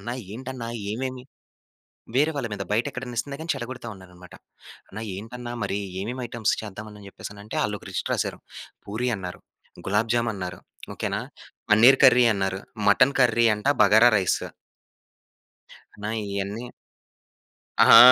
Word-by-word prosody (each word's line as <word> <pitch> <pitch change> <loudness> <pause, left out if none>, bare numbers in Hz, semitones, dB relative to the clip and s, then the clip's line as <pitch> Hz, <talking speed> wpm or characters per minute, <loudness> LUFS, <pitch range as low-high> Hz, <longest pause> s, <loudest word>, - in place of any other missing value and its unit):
అన్నా 120 +5 -4 0.2
ఏంటన్నా? 130 -1 -6 0.2
ఏమేమి? 130 +2 -4 0.9
వేరే 150 +4 +4
వాళ్ళ 135 -5 -2
మీద 100 - -4
బయటెక్కడన్నా 120 +3 -2
ఇస్తున్నా 140 +4 -3
గాని 165 +1 -1
చెడగొడతా 120 0 -6
ఉన్నారన్నమాట. 90 -1 -14 0.5
అన్నా 110 +3 -7
ఏంటన్నా? 120 +4 -7
మరి 100 0 -1 0.2
ఏమేం 120 +6 -4
ఐటెమ్స్ 115 -2 0
చేద్దాం 105 +1 -8
అని 105 -1 -13
చెప్పేసనంటే 105 +2 -8
వాళ్ళొక - - -3
లిస్ట్ - - -3
రాసారు. - - -2 0.5
పూరి 110 +5 -2
అన్నారు, 90 -2 -7 0.5
గులాబ్ 105 +4 +1
జామ్ 120 -1 +1
అన్నారు, 90 -2 -6 0.3
ఓకేనా? - - -2 0.5
పనీర్ 120 +6 +7
కర్రీ 125 0 +7
అన్నారు, 95 -1 -1 0.3
మటన్ 125 +7 +5
కర్రీ 120 -2 +4
అంట 105 - -2
బగారా 110 +4 +7
రైస్. 95 -2 0 1.6
నా 105 - -2 0.2
ఇయన్నీ 100 +3 -3 1.2
ఆహా! - - +10
115 Hz, 130 wpm, -25 LUFS, 100-125 Hz, 1.6 s, ఆహా